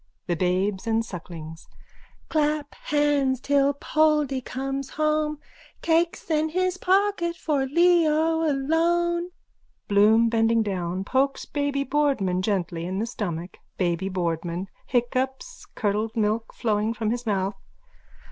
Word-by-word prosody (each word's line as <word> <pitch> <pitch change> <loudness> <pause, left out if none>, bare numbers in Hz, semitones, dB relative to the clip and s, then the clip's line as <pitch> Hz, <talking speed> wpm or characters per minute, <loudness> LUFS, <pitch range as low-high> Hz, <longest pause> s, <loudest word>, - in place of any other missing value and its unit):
THE 175 - 0
BABES 185 +4 0
AND 225 0 +1
SUCKLINGS: 165 -4 -9 0.6
Clap 300 -1 0
clap - - -17
hands 290 -3 +2
till 280 +1 +2
Poldy 300 -3 +1
comes 270 +2 -4
home, 305 0 0 0.5
Cakes 335 +1 +1
in 310 0 +2
his 370 +2 0
pocket 380 -3 +1
for 290 -5 -1
Leo 325 0 +3
alone. 340 +4 +1 0.6
(Bloom, 215 +3 +5
bending 225 0 +2
down, 185 -2 -2
pokes 270 +6 0
Baby 285 -1 -1
Boardman 265 -11 +1
gently 180 -4 -1
in 185 +1 -3
the 215 - 0
stomach.) 180 -6 -5 0.2
BABY 180 +1 0
BOARDMAN: 175 0 -2 0.2
_(Hiccups, 260 - -1
curdled 215 +1 -1
milk 220 +1 0
flowing 215 0 -1
from 215 -1 -1
his 240 0 -4
mouth.) 195 -1 -1
260 Hz, 120 wpm, -25 LUFS, 200-305 Hz, 0.6 s, Bloom